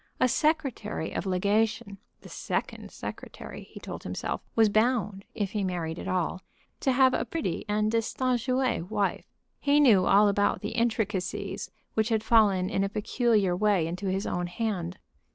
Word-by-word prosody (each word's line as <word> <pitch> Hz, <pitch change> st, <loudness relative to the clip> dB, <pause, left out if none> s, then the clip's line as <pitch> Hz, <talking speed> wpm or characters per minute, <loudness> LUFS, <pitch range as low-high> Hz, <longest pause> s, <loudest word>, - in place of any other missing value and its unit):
A -, -, +4 dB
secretary 270 Hz, -, 0 dB
of -, -, -3 dB
legation, 200 Hz, +1 st, 0 dB, 0.2 s
the -, -, -12 dB
second -, -, -4 dB
secretary, -, -, -8 dB
he -, -, -10 dB
told -, -, -7 dB
himself, -, -, -4 dB
was 225 Hz, -1 st, +5 dB
bound, 215 Hz, -2 st, +1 dB
if 200 Hz, -3 st, -2 dB
he 210 Hz, -2 st, -1 dB
married 175 Hz, -3 st, -3 dB
at -, -, -6 dB
all, 185 Hz, 0 st, -1 dB, 0.4 s
to 265 Hz, -, +1 dB
have 260 Hz, 0 st, +4 dB
a -, -, +1 dB
pretty 310 Hz, -, -3 dB
and 210 Hz, +1 st, +1 dB
distinguée 250 Hz, -2 st, 0 dB
wife. 205 Hz, -2 st, -1 dB, 0.3 s
He 285 Hz, +1 st, +3 dB
knew 220 Hz, -10 st, +5 dB
all 205 Hz, +1 st, +6 dB
about 205 Hz, 0 st, +1 dB
the 210 Hz, -, -3 dB
intricacies 220 Hz, -5 st, -2 dB, 0.2 s
which 220 Hz, +1 st, +1 dB
had 220 Hz, -2 st, +1 dB
fallen 205 Hz, -5 st, +4 dB
in 195 Hz, -1 st, 0 dB
a 195 Hz, -, 0 dB
peculiar 210 Hz, -2 st, +1 dB
way 200 Hz, -3 st, +2 dB
into 180 Hz, +4 st, -4 dB
his 190 Hz, +2 st, -1 dB
own 175 Hz, 0 st, -2 dB
hand. 180 Hz, -2 st, -3 dB
210 Hz, 160 wpm, -28 LUFS, 190-230 Hz, 0.4 s, all